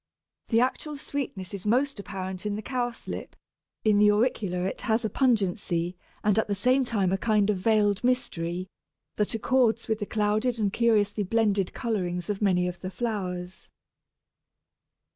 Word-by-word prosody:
The 230 - +3
actual 290 +4 -1
sweetness 245 -10 -5
is 200 0 -5
most 260 +2 +2
apparent 190 0 -4
in 205 - -1
the 215 - -5
Cowslip; 245 -1 -4 0.5
in 210 -2 +4
the 210 - +6
Auricula 205 -5 0
it - - -4
has 225 0 +1
a 215 - -1
pungency, 190 -8 +1 0.3
and 210 0 +3
at - - 0
the 205 - 0
same 255 +7 +3
time 205 -7 0
a 195 - 0
kind 210 -2 +2
of 200 - -1
veiled 210 0 +2
mystery, 180 -8 -1 0.5
that 210 +1 0
accords 230 0 +2
with 220 -1 0
the 205 - -3
clouded 215 +3 +1
and 205 -3 0
curiously 215 -3 +2
blended 205 -2 +1
colourings 180 -5 -2
of 200 - -5
many 180 -3 +3
of 180 -1 -5
the 185 - -5
flowers. 185 -4 -4
210 Hz, 160 wpm, -27 LUFS, 190-230 Hz, 0.5 s, the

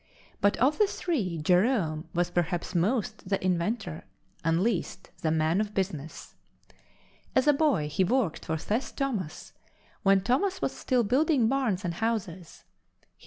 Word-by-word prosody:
But 200 - +3
of 275 +5 +2
the 420 - +5
three, 230 - -2
Jerome 175 - +1
was 175 -1 0
perhaps 175 0 -1
most 210 +2 -1
the 195 -2 0
inventor 180 -1 -1 0.4
and 165 0 +2
least 195 -4 -2
the 160 - +1
man 160 +4 +2
of 210 -1 -4
business. 165 -5 -4 1.0
As 260 - +4
a 295 - +6
boy, 275 - +2
he 150 +5 +1
worked 210 -3 0
for 160 - -1
Seth 215 - -2
Thomas 210 - -3 0.5
when 195 0 +4
Thomas 365 - +1
was - - -1
still 250 -3 0
building 260 +2 +3
barns 230 -7 0
and 170 - -1
houses. 190 -5 -3
195 Hz, 145 wpm, -28 LUFS, 170-250 Hz, 1.0 s, a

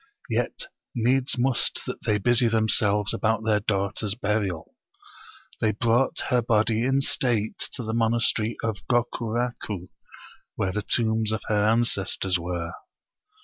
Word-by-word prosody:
Yet - - -1 0.3
needs 125 +3 +1
must 125 0 +1
that - - -6
they 105 - +2
busy 120 +3 +3
themselves 110 -2 +2
about 110 0 0
their 105 -2 +3
daughter's 100 0 -1
burial. 105 -6 -2 0.9
They 110 -1 +1
brought 115 +5 +1
her 125 -1 +3
body 110 0 +2
in 135 +1 +2
state 120 -7 0
to 125 - -4
the 110 0 -3
monastery 115 -1 +1
of 110 -3 -1
Gokuraku, 120 -5 -1 0.7
where 95 - -1
the 105 +3 -2
tombs 110 0 0
of 110 - -2
her 105 -1 +2
ances 110 -4 +2
tors 95 -2 +1
were. 85 -1 -3
110 Hz, 135 wpm, -25 LUFS, 105-120 Hz, 0.9 s, busy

